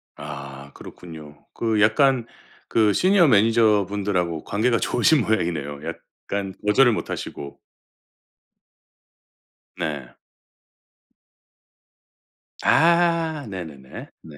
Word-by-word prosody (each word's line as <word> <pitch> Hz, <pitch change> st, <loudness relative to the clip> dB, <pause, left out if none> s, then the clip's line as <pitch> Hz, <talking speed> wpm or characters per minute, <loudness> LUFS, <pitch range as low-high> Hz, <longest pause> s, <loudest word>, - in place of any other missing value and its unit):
아 70 Hz, -1 st, -9 dB
그렇군요. 75 Hz, -3 st, -13 dB
그 110 Hz, -3 st, -1 dB
약간 125 Hz, +3 st, +3 dB, 0.4 s
그 110 Hz, -2 st, +2 dB
시니어 185 Hz, -2 st, +4 dB
매니저분들하고 100 Hz, -, +1 dB
관계가 115 Hz, +3 st, 0 dB
좋으신 140 Hz, +3 st, +2 dB
모양이네요. 80 Hz, -10 st, -2 dB
약간 100 Hz, -1 st, -6 dB
거절을 120 Hz, +4 st, +4 dB
못 105 Hz, -, -4 dB
하시고. 70 Hz, -1 st, -7 dB, 2.2 s
네. 70 Hz, -5 st, -5 dB, 2.5 s
아 165 Hz, -2 st, +2 dB
네네네. 80 Hz, -8 st, -9 dB
네. 75 Hz, -2 st, -14 dB
100 Hz, 190 characters per minute, -22 LUFS, 75-120 Hz, 2.5 s, 시니어